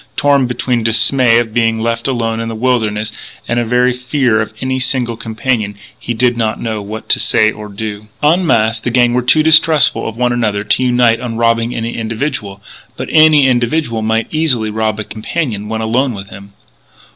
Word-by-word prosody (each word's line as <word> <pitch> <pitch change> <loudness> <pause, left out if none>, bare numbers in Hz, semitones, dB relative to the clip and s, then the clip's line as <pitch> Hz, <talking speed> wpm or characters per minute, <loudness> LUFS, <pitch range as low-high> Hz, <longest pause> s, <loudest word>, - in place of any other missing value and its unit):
Torn 140 -2 +2
between 125 0 -1
dismay 115 +2 +3
of 115 -2 -1
being 115 -1 +1
left 115 +1 -2
alone 115 -3 -1
in 115 0 -3
the 115 - -5
wilderness, 110 -3 -1 0.4
and 120 - 0
a - - 0
very 125 +2 +2
natural 125 0 -8
fear 125 -6 +2
of 110 - -4
any 130 0 -2
single 125 -2 -2
companion, 110 -2 -2 0.2
he 120 - -4
did 120 +1 +2
not 110 -2 -2
know 110 -2 -3
what 105 +2 -8
to - - +3
say 110 0 +2
or 105 -1 -9
do. 105 0 -6 0.2
En 165 +5 +3
masse, 115 -8 +2
the 120 - -3
gang 120 0 +2
were 125 - +1
too 155 +5 +3
distrustful 160 -5 +4
of 115 - -11
one 125 0 +1
another 105 -4 -1
to 105 +4 +1
unite 120 -2 +3
on 115 -2 -5
robbing 115 0 +1
any 115 +1 -4
individual. 110 -3 -4 0.3
But - - -5
any 155 -3 +5
individual 120 -1 0
might 110 +1 0
easily 130 -9 0
rob 110 0 -1
a - - -2
companion 110 -1 -4
when 110 0 -3
alone 120 +3 0
with 100 0 -9
him. 100 +1 -12
115 Hz, 195 wpm, -14 LUFS, 110-125 Hz, 0.4 s, any